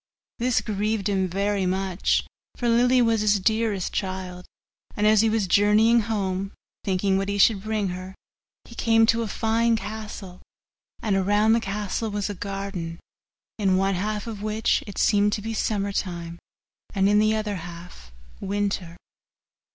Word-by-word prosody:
This 245 0 +2
grieved 210 -1 -1
him 190 -2 +1
very 195 +1 0
much, 190 0 0 0.3
for 240 - -1
Lily 245 +2 +4
was 225 -2 +2
his 210 -1 +3
dearest 215 -1 0
child; 185 -2 -4 0.5
and 210 - +1
as 215 -1 +5
he 225 - +3
was 220 -2 +1
journeying 210 +5 +4
home, 195 -3 -2 0.3
thinking 190 0 +1
what 195 +1 -2
he 200 - -1
should 200 0 +4
bring 215 -2 -1
her, 185 +1 -7 0.5
he - - -13
came 225 -1 +3
to 230 +1 +2
a 230 - -2
fine 225 +2 +1
castle; 210 -4 -7 0.6
and 210 -3 +1
around 205 +3 +3
the 230 - +3
castle 210 +1 -3
was 205 0 -2
a - - -4
garden, 195 -4 -5 0.6
in 190 -3 +2
one 195 +1 +1
half 210 +3 -2
of 220 -3 -6
which 215 +1 0
it 200 - -9
seemed 205 -1 +3
to 210 - -2
be 225 +1 -3
summer 205 -2 -1
time 170 -3 -4 0.6
and 195 0 +3
in 205 +1 +4
the 215 +1 +3
other 210 -2 -2
half 170 - -10 0.3
winter. 195 -4 -2
205 Hz, 160 wpm, -24 LUFS, 190-220 Hz, 0.6 s, as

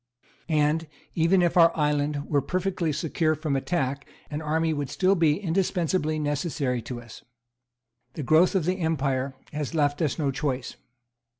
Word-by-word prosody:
And, 155 +1 +2 0.3
even 175 +3 +3
if 170 - +1
our 170 -1 +7
island 150 -1 0
were 145 -2 +2
perfectly 185 -2 -1
secure 155 +1 0
from 155 -2 -2
attack, 140 -1 -1 0.2
an 150 +1 -3
army 160 +1 0
would 145 -3 -3
still 190 +5 +2
be 165 -3 +2
indispensably 175 -3 0
necessary 145 -4 -1
to 120 +2 -6
us. 115 -2 -13 0.9
The 150 - -5
growth 160 +9 +4
of 180 -5 +1
the 185 +2 0
empire 140 -5 -1 0.2
has 150 +1 -4
left 145 -1 +1
us 150 -5 0
no 145 -4 0
choice. 135 -2 -3
155 Hz, 155 wpm, -26 LUFS, 145-165 Hz, 0.9 s, our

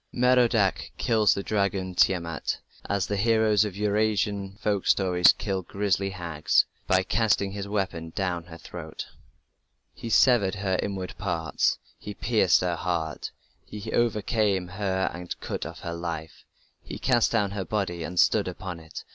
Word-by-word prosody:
Merodach 120 -5 +3
kills 110 -3 +3
the 100 - -3
dragon, 100 -3 -1
Tiamat, 85 -4 +1 0.3
as 100 -3 +1
the 100 - -2
heroes 110 -1 +3
of 105 -3 -4
Eur 105 0 0
Asian 105 -2 0
folk 100 -2 -1
stories 90 -2 +5
kill 95 -3 -3
grisly 100 +1 -1
hags, 85 -5 +1 0.2
by 95 0 +3
casting 105 -2 +1
his 100 0 -5
weapon 95 -5 -2
down 90 -3 -2
her 85 -1 -11
throat. - - -8 0.9
He 115 - -7
severed 110 -4 +4
her 95 -2 -1
inward 95 -2 -4
parts, 85 -5 0 0.2
he 105 - -7
pierced 110 -5 +3
her 90 -2 -1
heart, 80 -3 -2 0.3
He 105 +1 -7
overcame 105 -4 +1
her 95 0 -1
and 90 0 -6
cut - - -4
off - - -10
her 85 - -4
life; 85 -2 -6 0.4
He - - -8
cast 120 -3 +2
down 105 -4 +1
her 100 -1 -3
body 95 -5 -2
and 90 +2 -3
stood - - +4
upon 90 -3 -6
it... 80 -1 -9
95 Hz, 155 wpm, -26 LUFS, 90-105 Hz, 0.9 s, stories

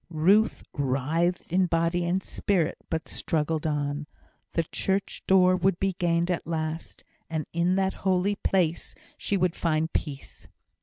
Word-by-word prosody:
Ruth 190 +7 +3
writhed 155 +6 0
in 185 0 +4
body 170 +1 +1
and 185 +2 0
spirit, 175 -5 0
but 160 0 -2
struggled 160 0 -1
on. 145 0 -2 0.5
The 165 - +1
church 195 +4 -2
door 185 -1 +5
would 185 0 +1
be 195 0 +1
gained 170 0 +1
at 170 - -2
last; 160 0 -4 0.3
and 160 -2 -2
in 170 +2 +2
that 190 0 +1
holy 190 +1 +2
place 175 -5 0 0.2
she 200 - -1
would 180 -2 +1
find 160 -1 0
peace. 140 -3 -5
170 Hz, 145 wpm, -27 LUFS, 155-185 Hz, 0.5 s, door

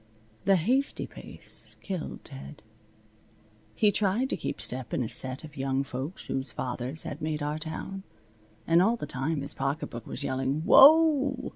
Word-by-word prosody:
The 195 - +5
hasty 250 - 0
pace - - -10
killed 185 -5 -5
Ted. 70 +1 -11 1.1
He 210 -1 +4
tried 210 +6 0
to - - +1
keep - - -4
step 125 0 -1
in - - 0
a - - -3
set 130 +5 +2
of 150 -2 -11
young 135 0 -1
folks 135 +6 -6
whose 135 +1 -3
fathers 130 +4 -1
had 145 - -6
made 155 -1 -2
our 150 +1 -2
town. 160 +5 -5 0.6
And 165 +1 +4
all 225 +5 +3
the 235 - -5
time 140 +3 -2
his 140 - -1
pocketbook 135 -4 -4
was - - -6
yelling, 135 +2 -1
"Whoa!" 280 - +6
155 Hz, 160 wpm, -28 LUFS, 135-195 Hz, 1.1 s, Whoa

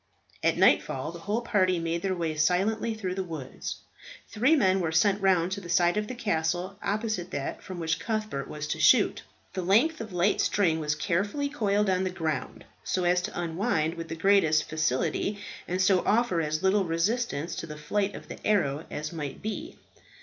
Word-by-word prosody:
At - - +2
nightfall 135 +4 +3
the 170 - -9
whole 205 +7 -1
party 185 -6 +2
made 165 0 -2
their 190 0 -1
way 165 -3 -2
silently 200 +8 +1
through 190 -4 -3
the 190 0 -2
woods. 155 -7 -6 0.5
Three 250 +9 +3
men 190 -8 +3
were 165 -3 -1
sent 195 +5 +3
round 185 -2 +3
to 200 +1 -3
the 175 - -10
side 175 +1 +3
of 210 0 -1
the 255 - -5
castle 180 -2 -1
opposite 210 -3 -2
that 140 -6 -4
from 185 - -8
which 165 -1 -1
Cuthbert 215 -11 -3
was 150 0 -5
to 160 - -2
shoot. 205 +7 +4 0.3
The 185 - -2
length 230 - +3
of 220 -2 -7
light 180 +3 +2
string 180 -5 +2
was 150 -1 -1
carefully 205 - -1
coiled 210 -7 +1
on 185 -1 +2
the 185 - 0
ground, 160 -4 -4 0.2
so 185 - -1
as 180 0 +3
to 180 - -5
unwind 165 -1 0
with 165 -1 -7
the 165 - -5
greatest 165 -3 +3
facility, 155 +6 0 0.3
and 180 +1 -2
so 190 -1 +4
offer 220 -6 +2
as 155 +2 -2
little 190 +1 +3
resistance 170 - -1
to 165 - -5
the 150 -1 -8
flight 200 +7 -1
of - - -10
the - - -10
arrow 160 -8 +1
as 155 +2 -5
might 150 0 -6
be. 300 +10 -5
185 Hz, 195 wpm, -28 LUFS, 165-205 Hz, 0.5 s, shoot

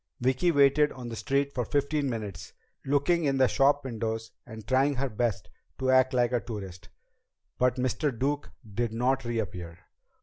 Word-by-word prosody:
Vicki 130 +7 +2
waited 145 0 +4
on 125 -2 -7
the 115 - -5
street 140 +4 0
for 125 - -1
fifteen 145 +3 0
minutes, 105 -7 -6 0.3
looking 145 +5 +2
in 135 -1 +1
the 130 - +5
shopwindows 115 -5 0 0.2
and 110 -2 -10
trying 135 +2 +3
her 135 +1 -1
best 105 -4 -1 0.3
to 130 0 +1
act 130 0 +5
like 125 -2 +2
a 120 - +2
tourist. 95 -4 -8 0.7
But 125 -1 +3
Mr. 130 +4 0
Duke 140 +4 -2 0.2
did 115 +1 -1
not 130 +3 +1
reappear. 90 -8 -4
125 Hz, 160 wpm, -28 LUFS, 115-140 Hz, 0.7 s, the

